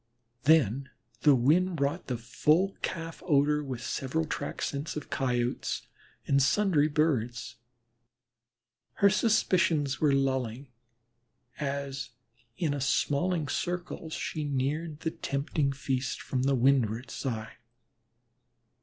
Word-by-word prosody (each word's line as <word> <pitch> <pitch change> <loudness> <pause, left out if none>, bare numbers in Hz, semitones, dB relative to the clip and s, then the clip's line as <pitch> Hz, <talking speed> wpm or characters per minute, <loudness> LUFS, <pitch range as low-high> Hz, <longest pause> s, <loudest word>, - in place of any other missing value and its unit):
Then 140 -4 +4 0.3
the 145 +2 +6
wind 165 +9 +3
brought 145 +4 -1
the 125 - -2
full 155 +11 +1
calf 165 -1 -4
odor 150 -2 +3
with 130 -4 -5
several 160 +5 -1
track - - -4
scents 145 +2 -3
of 150 - -6
Coyotes 125 -3 -1 0.4
and 140 0 +3
sundry 160 0 +3
Birds. 125 -6 0 1.4
Her 200 0 +4
suspicions 175 - +2
were 150 -2 +4
lulling 130 -2 0 0.9
as 140 -2 -3 0.5
in 155 -5 0
a 145 - -3
smalling 150 +4 +1
circle 175 +2 -3
she 155 0 -3
neared 145 +3 -2
the 160 - -1
tempting 140 0 -1
feast 135 -1 -2
from 130 - -2
the 135 +1 +2
windward 125 -1 +2
side. 115 -4 -4
140 Hz, 110 wpm, -29 LUFS, 130-160 Hz, 1.4 s, the